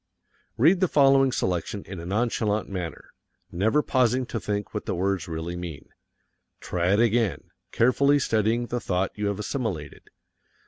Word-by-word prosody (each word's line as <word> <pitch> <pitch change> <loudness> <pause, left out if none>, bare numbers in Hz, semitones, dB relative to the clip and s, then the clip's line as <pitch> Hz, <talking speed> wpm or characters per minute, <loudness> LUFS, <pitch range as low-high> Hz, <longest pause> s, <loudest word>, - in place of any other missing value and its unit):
Read 165 +10 +5
the 185 - +3
following 135 -3 +4
selection 95 -2 -2
in 95 -2 -8
a 85 - -7
nonchalant 110 0 0
manner, 90 -5 -6 0.4
never 110 +12 +2
pausing 130 0 +2
to 120 - -4
think 105 -1 -3
what - - -5
the - - -1
words 95 +1 -1
really 80 +1 -4
mean. 85 -4 -7 0.7
Try 90 +1 0
it 105 - +3
again, 115 -3 +1 0.2
carefully 140 +4 +3
studying 115 -2 +1
the 120 0 -3
thought 95 -3 -1
you 105 -1 -2
have 100 -1 -1
assimilated. 105 - -4
105 Hz, 150 wpm, -25 LUFS, 90-125 Hz, 0.7 s, Read